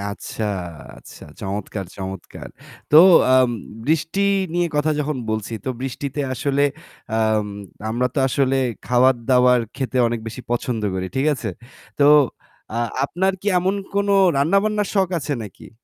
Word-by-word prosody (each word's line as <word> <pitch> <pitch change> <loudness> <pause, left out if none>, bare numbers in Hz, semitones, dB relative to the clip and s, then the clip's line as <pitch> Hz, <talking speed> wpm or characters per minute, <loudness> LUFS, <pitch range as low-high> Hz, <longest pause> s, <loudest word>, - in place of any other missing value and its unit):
আচ্ছা, 100 +2 -5 0.5
আচ্ছা। - - -14 0.2
চমৎকার, 100 0 -4
চমৎকার! 95 -1 -7 0.4
তো 150 - +6 0.4
আম 130 -1 +5 0.3
বৃষ্টি 160 +6 0 0.3
নিয়ে 175 0 +2
কথা 150 +1 +2
যখন 150 0 -2
বলছি 110 +1 -3
তো - - -3
বৃষ্টিতে 135 +2 -4
আসলে 140 +2 0 0.5
আম 110 -1 +1 0.4
আমরা 120 +3 0
তো - - 0
আসলে 135 0 +1 0.3
খাবার-দাবার 125 0 +3
খেতে 130 -1 -4
অনেক 115 -1 -3
বেশি 115 +3 -6
পছন্দ 120 -1 -1
করি। 95 0 -2
ঠিক 135 +3 +1
আছে? 120 -4 -5 0.5
তো 145 - +4 0.7
আ - - -4 0.3
আপনার 190 +6 0
কি 200 - -11
এমন 185 +2 0 0.2
কোন 200 0 +1 0.3
রান্নাবান্নার 200 +7 +2
শখ 190 -3 +2
আছে 150 -1 -3
নাকি? 105 +1 -12
130 Hz, 135 wpm, -21 LUFS, 110-150 Hz, 0.7 s, তো